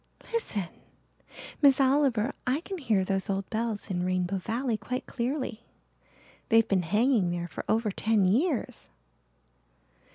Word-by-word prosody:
Listen, 210 - -1 0.9
Miss 275 -2 +6
Oliver 265 -3 +2
I 265 +5 +1
can 380 +1 -6
hear 215 -9 +1
those 195 +1 -1
old 195 0 -1
bells 220 -2 -2
in 180 -1 -1
Rainbow 185 +1 0
Valley 235 +4 -1
quite 250 +4 -4
clearly. 245 -2 -3 0.9
They've 225 -2 +5
been 195 -2 +2
hanging 210 +2 +2
there 175 0 -3
for - - -7
over 220 -1 +1
ten 215 0 +2
years." 255 - 0
225 Hz, 130 wpm, -28 LUFS, 195-260 Hz, 0.9 s, Miss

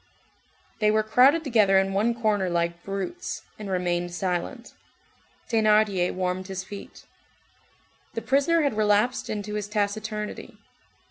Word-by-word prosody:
They 215 -1 +3
were 215 0 +3
crowded 260 +9 +4
together 215 -8 +4
in 195 0 +2
one 220 +4 +1
corner 205 -5 +1
like 170 0 -1
brutes, 195 - -5 0.2
and 210 -2 -6
remained 175 -1 -1
silent. 185 +7 -3 0.7
Thénardier 215 -5 +2
warmed 185 0 -2
his 190 -1 -5
feet. 200 +1 -10 1.1
The 230 - -3
prisoner 280 +7 +2
had 280 -6 0
relapsed 215 +3 +2
into 210 0 -4
his 210 -1 -3
taciturnity. 210 0 -3
210 Hz, 125 wpm, -25 LUFS, 190-220 Hz, 1.1 s, crowded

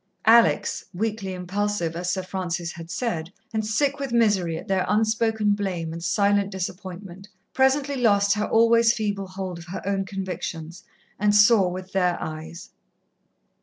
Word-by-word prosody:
Alex, 230 +1 +4
weakly 210 -1 -2
impulsive, 185 -1 -2
as 175 +1 -2
Sir 190 0 -2
Francis 180 -2 -3
had 165 -1 -10
said, 175 -7 -3 0.2
and 220 0 0
sick 275 +7 0
with 275 -3 -4
misery 205 -8 +2
at - - -9
their 190 -1 +1
unspoken 220 0 +1
blame 185 -5 -2
and 165 0 -7
silent 200 +2 +2
disappointment, 190 0 -7 0.3
presently 270 +1 +2
lost 200 -4 +3
her 210 +1 -1
always 230 0 +4
feeble 205 -4 -2
hold 185 -2 -6
of 170 - -11
her 180 - -6
own 195 0 0
convictions, 180 -3 -6 0.4
and 205 +1 +3
saw 210 -2 +6
with 185 +1 -7
their 180 -2 +1
eyes. 160 +3 -7
195 Hz, 150 wpm, -24 LUFS, 180-220 Hz, 0.4 s, saw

